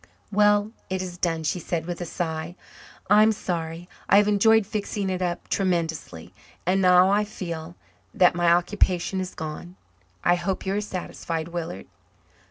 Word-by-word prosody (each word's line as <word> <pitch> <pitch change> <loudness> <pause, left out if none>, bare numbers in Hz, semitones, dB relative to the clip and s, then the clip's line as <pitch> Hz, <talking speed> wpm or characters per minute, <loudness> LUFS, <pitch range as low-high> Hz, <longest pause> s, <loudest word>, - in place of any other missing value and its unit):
"Well, 205 +1 +3 0.2
it 190 0 -1
is 180 -1 -6
done," 165 -3 0
she 170 +4 -1
said 165 -1 -3
with 175 0 -5
a 175 - -4
sigh. 160 0 -4 0.5
"I'm 215 +2 +6
sorry. 170 -4 -4 0.2
I 200 - +7
have 205 0 +5
enjoyed 220 +1 +4
fixing 205 -1 -3
it 185 0 -3
up 175 -1 -2
tremendously, 165 - -2 0.3
and 190 +2 +2
now 180 +1 +6
I 205 +1 +3
feel 170 -5 -6 0.4
that 180 - +4
my 175 -1 +3
occupation 180 +1 +1
is 185 0 -6
gone. 160 +2 -7 0.5
I 175 - +4
hope 180 +3 -2
you 190 - 0
are 205 - 0
satisfied, 170 -4 -5
Willard." 165 - -5
180 Hz, 160 wpm, -25 LUFS, 170-195 Hz, 0.5 s, I